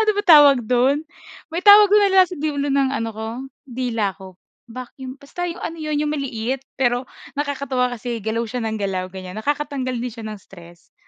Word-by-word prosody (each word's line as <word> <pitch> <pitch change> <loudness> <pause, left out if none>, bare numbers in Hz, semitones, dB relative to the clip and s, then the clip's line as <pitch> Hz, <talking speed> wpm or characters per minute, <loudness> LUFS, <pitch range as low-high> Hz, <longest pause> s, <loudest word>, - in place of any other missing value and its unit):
Ano 435 - +3
ba 410 - +1
tawag 295 -7 +7
dun? 255 +6 +2 0.5
May 330 - -3
tawag 415 0 +9
dun 420 0 +6
na 390 - +1
nasa 365 0 -3
dulo 290 -1 -2
ng 275 -1 +2
ano 230 -4 -2
ko, 220 +1 -5 0.4
dila 235 -6 -2
ko. 190 -2 -13 0.3
Vacuum, 255 +2 -9
basta 350 +6 -5
'yung 335 - -7
ano 330 - -5
'yun, 305 -1 -2
'yung 300 - -1
maliit, 260 -2 -3 0.2
pero 245 -1 0 0.2
nakakatuwa 280 -3 -1
kasi 235 0 -5
galaw 220 +2 -2
siya 245 +2 -5
ng 220 -1 -2
galaw 190 -3 -3
ganyan, 185 +2 -8
nakakatanggal 280 -1 -2
din 240 0 -4
siya 225 -1 -9
ng 215 - -6
stress. 175 -3 -17
255 Hz, 190 wpm, -21 LUFS, 220-290 Hz, 0.5 s, tawag